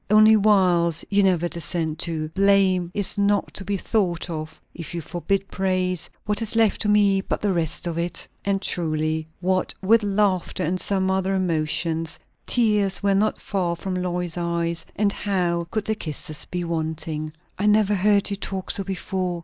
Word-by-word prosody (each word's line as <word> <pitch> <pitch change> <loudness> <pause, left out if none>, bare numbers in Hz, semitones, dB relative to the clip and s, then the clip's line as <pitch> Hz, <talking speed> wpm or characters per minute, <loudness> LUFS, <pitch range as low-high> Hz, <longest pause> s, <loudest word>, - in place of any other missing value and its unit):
Only 215 +1 +7
'wiles' 180 -6 +3
you 200 0 +4
never 180 -3 +2
descend 165 -1 -2
to; 155 -2 -2
'blame' 190 -1 +3
is 205 +1 -2
not 200 0 +1
to 195 - -3
be 200 +1 -1
thought 180 -4 -1
of; 155 0 -6
if 170 0 -7
you 170 - -3
forbid 190 +5 -2
praise, 185 -2 -1 0.2
what 210 0 -1
is 225 0 +3
left 225 -2 +3
to 210 - 0
me 200 -2 +4
but - - -3
the 205 -2 +1
rest 165 -1 -1
of 170 -1 -2
it?" 170 0 -3 0.2
And 195 0 0
truly, 155 -2 -1
what 185 0 0
with 220 +4 +4
laughter 200 -3 0
and 180 +4 -1
some 190 -1 0
other 190 0 0
emotions, 165 -2 -1 0.3
tears 210 -5 +2
were 200 -1 +3
not 210 +2 +1
far 180 -4 -1
from 185 +2 -5
Lois's 180 -1 -2
eyes; 170 -1 -1
and 200 -1 +1
how 175 -4 -1
could 215 +1 -2
the 220 - +1
kisses 155 -5 -3
be 180 0 -3
wanting? 160 -2 -3 0.3
"I 205 - +1
never 210 -1 +4
heard 205 +1 +2
you 200 - -2
talk 190 -2 -3
so 195 - 0
before!" 185 -2 -3
185 Hz, 175 wpm, -23 LUFS, 170-200 Hz, 0.3 s, Only